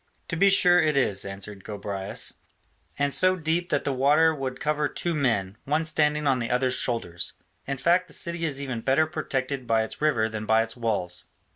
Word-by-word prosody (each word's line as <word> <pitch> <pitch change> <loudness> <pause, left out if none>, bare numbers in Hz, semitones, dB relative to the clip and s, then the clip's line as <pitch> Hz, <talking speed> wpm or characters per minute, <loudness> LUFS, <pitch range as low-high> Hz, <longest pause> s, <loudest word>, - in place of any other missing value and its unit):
"To - - -2
be 195 +4 +4
sure 180 -2 +5
it 155 -2 +1
is," 100 -8 +2
answered 100 0 -7
Gobryas, 100 -2 -3 0.6
"and 140 -1 0
so 185 0 +5
deep 170 +1 -1
that - - 0
the 140 - -1
water 150 +5 +4
would 130 -3 -5
cover 150 0 0
two 175 +3 -2
men, 115 -9 0
one 150 +3 0
standing 150 -1 +1
on 135 -2 +2
the 115 - -3
other's 125 +1 +1
shoulders; 95 -8 -2 0.3
in 140 0 -2
fact 175 +6 +2
the - - -10
city 170 -1 -3
is 145 -4 -1
even 130 -5 -4
better 135 +6 +3
protected 140 -5 -3
by 115 -1 +2
its 110 - -7
river 140 -8 +2
than 110 -1 -6
by 110 0 +4
its 115 0 -5
walls." 105 -7 -2
135 Hz, 195 wpm, -26 LUFS, 110-155 Hz, 0.6 s, sure